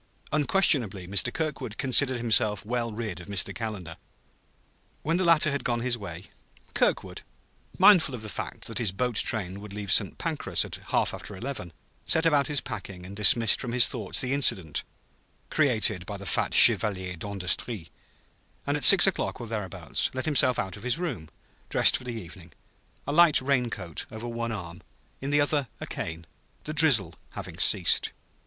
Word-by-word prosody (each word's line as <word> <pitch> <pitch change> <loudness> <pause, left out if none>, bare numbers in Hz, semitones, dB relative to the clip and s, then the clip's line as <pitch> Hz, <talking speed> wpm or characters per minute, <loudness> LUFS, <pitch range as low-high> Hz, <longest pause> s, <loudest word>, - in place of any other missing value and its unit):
Unquestionably 135 - +1
Mr. 100 +5 0
Kirkwood 150 -9 -5
considered 130 0 +2
himself 110 -3 +1
well 120 0 -3
rid 105 -5 -6
of 90 - -13
Mr. 100 -2 -1
Calendar. 100 -8 -7 1.1
When 165 +3 0
the 185 - -1
latter 165 -3 +4
had 140 - -3
gone 120 -2 -2
his 125 0 0
way, 90 -6 -9 0.5
Kirkwood, - - -1 0.6
mindful 180 -8 +5
of 110 - -9
the - - -7
fact - - -6
that 115 - -1
his 110 -6 0
boat 125 +6 -3
train 100 -4 -1
would 105 -1 -11
leave 100 -2 -5
St. - - +2
Pancras - - -1
at - - -8
half - - 0
after 105 - -9
eleven, 105 -4 -7 0.3
set 160 +1 0
about 145 -4 +2
his 150 -3 0
packing 90 -2 -8
and 95 +2 -10
dismissed 105 +2 +4
from 120 -3 -5
his 125 -1 +6
thoughts 110 -7 -3
the 130 +1 -2
incident 95 - +1 0.7
created 110 - +1
by 100 - -6
the 100 - -10
fat - - -1
chevalier 95 -4 +6
d'industrie; 100 0 -2 0.7
and - - -1
at - - -7
six - - +9
o'clock, - - -1
or 120 - -7
thereabouts, 105 -5 -2
let 130 - -3
himself 135 -5 +2
out 95 -1 -4
of 100 - -12
his 125 +4 -2
room, 125 - -5 0.4
dressed - - +5
for 125 - -6
the 120 -2 -6
evening, 90 -2 -13 0.5
a - - -4
light 170 0 +5
rain 130 -2 -1
coat 90 -7 -5
over 110 +2 -8
one 115 0 -4
arm, 85 -5 -8 0.4
in 135 - -5
the 145 +1 +2
other 145 +1 +1
hand 140 -3 -3
a - - -6
cane, 80 0 -7 0.4
the 155 - -6
drizzle 125 - +3 0.2
having - - -9
ceased. - - +3
115 Hz, 175 wpm, -26 LUFS, 100-135 Hz, 1.1 s, six